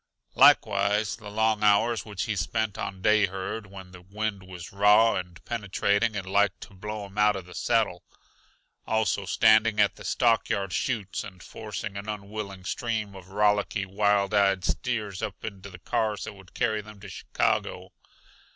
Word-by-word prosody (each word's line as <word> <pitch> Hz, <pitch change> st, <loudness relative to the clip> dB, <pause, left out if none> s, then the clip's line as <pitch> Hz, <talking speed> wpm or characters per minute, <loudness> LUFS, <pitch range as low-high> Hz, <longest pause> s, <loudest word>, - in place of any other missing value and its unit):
Likewise 100 Hz, +1 st, +4 dB
the 110 Hz, -3 st, -10 dB
long 110 Hz, 0 st, +1 dB
hours 105 Hz, +3 st, +3 dB
which 105 Hz, -3 st, -4 dB
he 110 Hz, -3 st, -2 dB
spent 105 Hz, +3 st, -1 dB
on 95 Hz, -1 st, -6 dB
day 105 Hz, -1 st, +4 dB
herd, 95 Hz, +3 st, -5 dB
when 95 Hz, -2 st, -11 dB
the 90 Hz, -1 st, -12 dB
wind 100 Hz, +2 st, -4 dB
was 90 Hz, -2 st, -10 dB
raw 105 Hz, +3 st, +5 dB
and 90 Hz, -1 st, -6 dB
penetrating 105 Hz, -1 st, 0 dB
and 100 Hz, -2 st, -3 dB
like 100 Hz, 0 st, +1 dB
to -, -, -11 dB
blow 105 Hz, +2 st, -6 dB
him 100 Hz, +1 st, -8 dB
out 105 Hz, 0 st, +4 dB
of 95 Hz, -2 st, -6 dB
the 90 Hz, -, -13 dB
saddle; 90 Hz, -1 st, 0 dB, 0.9 s
also 110 Hz, -3 st, 0 dB
standing 110 Hz, +1 st, +4 dB
at -, -, +3 dB
the -, -, -11 dB
stockyard 100 Hz, -2 st, +1 dB
chutes 105 Hz, -6 st, -2 dB
and 95 Hz, -3 st, -11 dB
forcing 105 Hz, -1 st, -6 dB
an 100 Hz, +2 st, -6 dB
unwilling 100 Hz, -2 st, -6 dB
stream 110 Hz, +1 st, -3 dB
of 95 Hz, -1 st, -12 dB
rollicky, 105 Hz, 0 st, +1 dB
wild 100 Hz, +1 st, +1 dB
eyed 100 Hz, -2 st, +3 dB
steers 110 Hz, -6 st, -2 dB
up 100 Hz, -, -5 dB
into 100 Hz, -2 st, -7 dB
the 90 Hz, -, -11 dB
cars 105 Hz, +4 st, -1 dB
that -, -, -6 dB
would 95 Hz, -2 st, -17 dB
carry 110 Hz, -2 st, 0 dB
them 105 Hz, 0 st, -13 dB
to 105 Hz, -, -10 dB
Chicago. 95 Hz, -, -2 dB
100 Hz, 170 wpm, -27 LUFS, 95-110 Hz, 0.9 s, raw